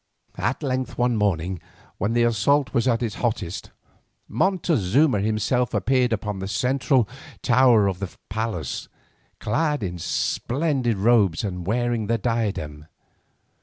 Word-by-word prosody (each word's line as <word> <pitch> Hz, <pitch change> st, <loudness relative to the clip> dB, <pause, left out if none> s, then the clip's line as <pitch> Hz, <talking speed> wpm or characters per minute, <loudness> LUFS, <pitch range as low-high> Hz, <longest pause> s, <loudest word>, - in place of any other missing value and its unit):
At -, -, -1 dB
length 130 Hz, -2 st, -2 dB
one 120 Hz, -1 st, +2 dB
morning, 95 Hz, -4 st, 0 dB, 0.4 s
when 105 Hz, +4 st, 0 dB
the 120 Hz, 0 st, +3 dB
assault 125 Hz, +5 st, +2 dB
was 120 Hz, +2 st, +1 dB
at 120 Hz, -1 st, +2 dB
its 110 Hz, -3 st, -2 dB
hottest, 105 Hz, -7 st, -2 dB, 0.6 s
Montezuma 145 Hz, -, +2 dB
himself 110 Hz, +3 st, 0 dB
appeared 125 Hz, +5 st, +2 dB
upon 105 Hz, -2 st, -2 dB
the 95 Hz, -, -4 dB
central 130 Hz, +2 st, +1 dB, 0.4 s
tower 120 Hz, -4 st, +5 dB
of 95 Hz, -2 st, -1 dB
the 100 Hz, -2 st, -4 dB, 0.2 s
palace, 110 Hz, -, -3 dB, 0.5 s
clad 150 Hz, +4 st, 0 dB
in 90 Hz, -2 st, -4 dB
splendid 130 Hz, -, -1 dB
robes 100 Hz, -5 st, +3 dB
and 90 Hz, -4 st, -4 dB
wearing 120 Hz, -1 st, 0 dB
the 115 Hz, +1 st, +1 dB
diadem. 100 Hz, -10 st, -2 dB
115 Hz, 130 wpm, -24 LUFS, 100-125 Hz, 0.6 s, tower